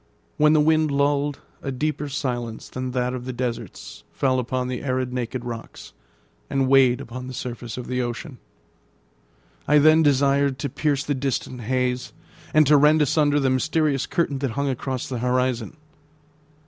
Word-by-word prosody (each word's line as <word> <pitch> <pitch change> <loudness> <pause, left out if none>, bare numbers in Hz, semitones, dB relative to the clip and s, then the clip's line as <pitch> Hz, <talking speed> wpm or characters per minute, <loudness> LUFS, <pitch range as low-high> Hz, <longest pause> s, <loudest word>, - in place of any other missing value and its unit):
When 150 +1 +5
the 155 - +5
wind 155 0 +3
lulled, 140 0 0 0.2
a 135 - -3
deeper 150 +2 -2
silence 120 -5 -4
than 130 0 -4
that 125 0 -1
of 125 -1 -5
the 130 - -3
deserts 120 - -5
fell 130 -2 +1
upon 125 +1 -2
the 125 -1 -4
arid, 130 -2 -1
naked 125 0 -3
rocks, 115 -1 -8 0.6
and 135 -1 +1
weighed 130 -2 +5
upon 125 -1 -7
the 130 - -7
surface 120 -2 -6
of 125 - -5
the 125 0 -2
ocean. 125 +3 -5 1.3
I 150 - +5
then 155 +2 +6
desired 140 -1 +3
to 140 +2 -3
pierce 145 -2 0
the 145 - -1
distant 130 -2 -3
haze, 125 +1 -1 0.4
and 155 0 +5
to 150 +1 +6
rend 150 +2 +5
asunder 145 0 +2
the 135 -2 +1
mysterious 150 +1 +1
curtain 145 -5 -1
that 135 -1 -1
hung 140 0 0
across 130 0 -3
the 125 -3 -4
horizon. 125 +1 -1
130 Hz, 165 wpm, -23 LUFS, 125-145 Hz, 1.3 s, then